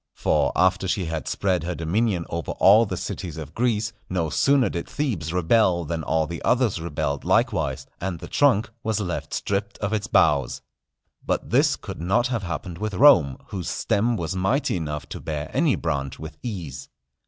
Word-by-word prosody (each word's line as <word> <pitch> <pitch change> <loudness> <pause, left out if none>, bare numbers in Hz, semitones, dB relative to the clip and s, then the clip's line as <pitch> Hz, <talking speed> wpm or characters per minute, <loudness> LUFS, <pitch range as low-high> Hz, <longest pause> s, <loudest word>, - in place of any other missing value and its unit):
For 70 -2 +1
after 95 +1 +2
she 95 0 0
had 80 -1 -4
spread 95 -3 0
her 85 +2 -3
dominion 90 +3 0
over 85 -3 -4
all 105 +4 +6
the - - -3
cities 85 -3 -5
of 75 -2 -7
Greece, 115 -2 0 0.2
no 85 -4 -1
sooner 140 -4 +3
did 85 -3 -4
Thebes 105 - -2
rebel 90 0 +2
than 80 +2 -3
all 80 +1 +1
the 85 +2 -6
others 120 -9 +1
rebelled 70 -4 -2
likewise, - - +1
and 90 -1 -3
the 85 +1 -9
trunk 125 -7 +2
was 110 -2 -1
left 90 -4 -4
stripped 100 +1 -2
of 105 +1 -2
its 105 -2 -1
boughs. 70 -4 +2 0.6
But - - -2
this - - +4
could - - -8
not 95 +9 +2
have 120 -4 -1
happened 85 -1 -5
with 105 -2 -3
Rome, 90 - +6
whose 95 -4 -4
stem 115 +3 0
was 85 +1 -3
mighty 95 +10 +1
enough 75 -3 -4
to - - -6
bear 75 -1 -4
any - - +3
branch 70 -1 -3
with 80 +1 -8
ease. 90 - -6
90 Hz, 180 wpm, -24 LUFS, 80-110 Hz, 0.6 s, all